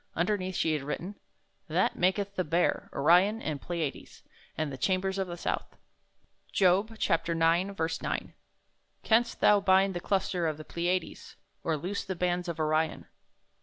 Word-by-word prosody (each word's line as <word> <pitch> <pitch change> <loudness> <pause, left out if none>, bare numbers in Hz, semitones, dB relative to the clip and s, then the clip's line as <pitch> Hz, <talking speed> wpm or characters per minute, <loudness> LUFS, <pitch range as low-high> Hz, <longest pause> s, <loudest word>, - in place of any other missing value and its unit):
Un 170 - +2
derneath 185 -2 -2
she 160 - +1
had 150 - -1
written: 165 +7 -4 0.5
That - - +1
maketh 195 +2 +1
the 185 - -1
Bear, 170 +2 0
Orion, 180 +9 +4
and 150 -9 -4
Pleiades, 165 -5 -5 0.3
And 155 -2 -1
the - - -5
chambers 190 +5 0
of 190 - -1
the 175 0 -6
south. - - -3 0.7
Job 200 +4 +2 0.3
9: 170 +4 +2 0.3
9. - - -3 0.7
Canst 235 +1 +2
thou 205 -1 +6
bind 195 0 +3
the 175 - -3
cluster 180 -2 0
of 155 -2 -2
the 155 - -9
Pleiades, 175 +2 -3 0.3
Or 160 -2 0
loose 185 +7 -3
the 190 -1 -4
bands 180 0 -1
of 170 -2 -4
Orion? 155 +1 0
180 Hz, 155 wpm, -29 LUFS, 165-195 Hz, 0.7 s, thou